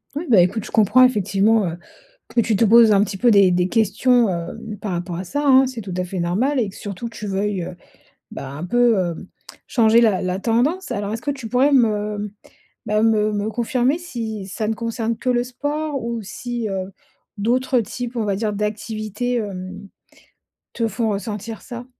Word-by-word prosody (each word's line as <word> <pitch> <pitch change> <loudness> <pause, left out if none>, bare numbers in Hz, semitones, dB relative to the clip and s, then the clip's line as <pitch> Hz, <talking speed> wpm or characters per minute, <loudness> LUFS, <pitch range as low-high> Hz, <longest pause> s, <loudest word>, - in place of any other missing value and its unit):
Oui, 310 - -3
bah, 200 -7 +7
écoute, 195 +5 0
je - - -9
comprends 220 +4 +5
effectivement, 210 -2 +3
heu, 170 +1 -4 0.5
que 240 - 0
tu 220 -1 0
te 225 - +3
poses 225 0 +7
un 200 0 +5
petit 195 -1 -4
peu 240 +3 +4
des 200 -2 +6
des 180 +1 +2
questions, 225 +2 +3
hem, 180 +4 -5
par 200 -3 -4
rapport 175 0 -4
à 185 - -4
ça 290 +11 -3
hein? 265 -1 +6
C'est 245 -3 -6
tout 190 -2 -7
à 180 - 0
fait 180 +1 -5
normal, 230 +12 0
et 215 - 0
que 190 - -13
surtout 205 +3 -6
que - - -16
tu 210 - -6
veuilles, 195 -1 -1
heu, 175 - -7 0.6
bah, 135 - -7
un 145 +5 -6
peu, 240 +2 +3
heu, 175 -2 0 0.5
changer 230 -1 +4
la 210 -5 +3
la 185 0 -1
tendance? 250 - 0
Alors 205 0 -3
est-ce 225 - -6
que 285 - -1
tu 265 -5 -6
pourrais 260 +5 +3
me, 210 -4 +1 0.6
bah, 210 0 +1
me 215 -1 +2
me 205 +1 -1
confirmer 250 +4 0
si 225 - -6
ça 210 +2 -3
ne 225 - -1
concerne 230 0 -2
que 255 - -2
le 240 -1 +2
sport 290 +3 -3
ou 235 -1 -3
si, 240 +2 -4
heu, 190 -1 -4 0.4
d'autres 245 +3 +1
types, 245 +3 -6
on 225 - 0
va 200 -2 0
dire, 215 -1 -1
d'activités, 215 +3 -3
hem, 195 -2 -5 0.8
te 230 -2 0
font 220 +1 -1
ressentir 210 +1 -4
ça? 240 -1 -8
220 Hz, 200 wpm, -21 LUFS, 200-240 Hz, 0.8 s, bah